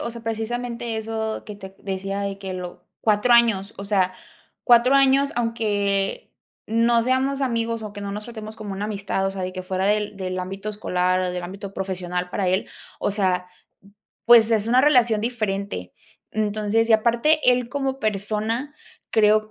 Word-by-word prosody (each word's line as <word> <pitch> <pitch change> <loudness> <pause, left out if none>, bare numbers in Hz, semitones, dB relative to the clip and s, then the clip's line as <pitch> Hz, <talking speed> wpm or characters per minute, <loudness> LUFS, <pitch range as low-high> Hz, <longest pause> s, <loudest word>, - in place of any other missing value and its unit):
o 235 - -3
sea, 235 0 -9
precisamente, 235 +1 -3
eso 220 0 -3
que 210 -1 -7
te 190 -1 -11
decía 195 0 -4
de 200 -1 -3
que 190 -1 -6
lo 180 -1 -7 0.2
4 215 +3 +3
años, 225 -4 +4
o 200 - -5
sea, 190 -3 +1 0.5
4 240 +2 +5
años, 275 +1 +4
aunque 205 -4 -1 0.3
no 230 +1 +3
seamos 265 +2 +1
amigos 230 -3 -1
o 210 -1 -6
que 205 - -8
no 200 0 -4
nos 210 +1 -5
tratemos 220 -2 -8
como 210 -2 -6
una 200 +2 -3
amistad, 200 -2 -2
o - - 0
sea, 190 -1 -5
de 185 0 -3
que 185 0 -5
fuera 185 +1 -1
del 210 -1 0
del 185 -1 -3
ámbito 195 +3 -5
escolar 185 -3 0
o 180 -1 -1
del 180 0 -4
ámbito 195 +2 -7
profesional 180 -2 -3
para 190 -2 0
él, 185 +2 0 0.3
o - - 0
sea, 185 -3 0 0.8
pues, 235 -1 +7
es 220 -1 +2
una 250 +2 +5
relación 245 -7 +4
diferente. 200 - -3 0.4
Entonces, 215 +1 0
y - - +8
aparte 235 +8 +3
él 245 -1 -1
como 270 0 -2
persona, 215 +6 -2 0.4
creo 215 0 +3
215 Hz, 175 wpm, -23 LUFS, 195-235 Hz, 0.8 s, y